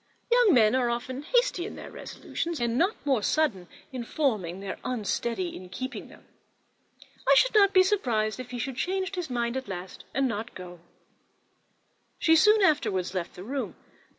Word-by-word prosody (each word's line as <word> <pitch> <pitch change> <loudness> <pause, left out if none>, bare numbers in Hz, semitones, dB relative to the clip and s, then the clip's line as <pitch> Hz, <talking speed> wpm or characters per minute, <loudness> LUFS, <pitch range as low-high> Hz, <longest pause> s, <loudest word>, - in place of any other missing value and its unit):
Young 475 - +5
men 220 -2 +5
are 255 -2 +2
often 255 +3 -3
hasty 485 0 +1
in 405 - -6
their - - -9
resolutions, 335 -1 -5
and 235 -1 0
not 365 - +2
more 265 -6 +2
sudden 205 - 0 0.2
in 255 -2 -4
forming 215 - -1
than 195 0 -5
unsteady 225 -5 -2
in 180 0 -10
keeping 255 +8 -6
them. - - -17 1.0
I - - +8
should - - +4
not 400 -2 +6
be 370 -1 +6
surprised 240 - 0
if 255 -1 -7
he 250 - -5
were - - -2
to 265 +3 -3
change 375 +8 -2
his 360 -5 -3
mind 240 -1 -1
at 265 - -5
last, 185 -1 -7
and 270 0 +1
not 225 0 -4
go." 180 -1 -9 1.4
She 325 - +4
soon 425 +6 +5
afterwards 200 - +1
left 180 -2 -4
the 180 - -8
room. 270 +5 -4
255 Hz, 180 wpm, -27 LUFS, 215-340 Hz, 1.4 s, I